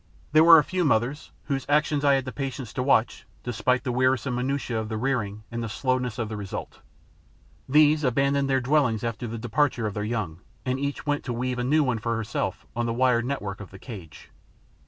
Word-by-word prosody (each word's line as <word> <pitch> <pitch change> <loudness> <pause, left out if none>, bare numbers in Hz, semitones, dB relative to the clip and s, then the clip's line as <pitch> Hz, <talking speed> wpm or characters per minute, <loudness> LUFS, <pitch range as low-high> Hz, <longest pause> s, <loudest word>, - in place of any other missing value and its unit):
There 155 +1 +6
were 165 0 +10
a 150 - +5
few 185 +2 -1
mothers 135 +1 0
whose 135 -2 -3
actions 150 0 +2
I 140 -1 +5
had 135 -1 -1
the 130 - -4
patience 135 -4 -5
to - - -2
watch, 125 -4 +1 0.2
despite 125 +1 0
the 130 - -1
wearisome 130 +1 +1
minutiae 125 -1 -1
of 110 -1 -4
the 110 - -3
rearing 110 -4 -2
and 115 0 -3
the 115 - -4
slowness 130 0 -1
of 115 -3 -2
the 110 - -5
result. 100 -2 -6 0.9
These 150 +2 +5
abandoned 140 +2 +2
their 135 -1 +2
dwellings 125 -5 +2
after 115 +1 -3
the 115 +1 -5
departure 120 +1 0
of 105 - -2
their 105 - -3
young; 105 -7 -3 0.3
and 130 +1 -1
each 140 0 -3
went 145 -1 0
to 125 - -2
weave 125 +1 -2
a - - 0
new 150 +5 +3
one 125 -4 0
for 115 +2 -1
herself 115 -1 -3
on 120 0 -1
the 115 - -1
wire 125 -1 +3
net 135 +1 -3
work 100 0 -5
of 100 - -9
the 95 - -12
cage. 95 - -11
125 Hz, 220 wpm, -26 LUFS, 115-140 Hz, 0.9 s, were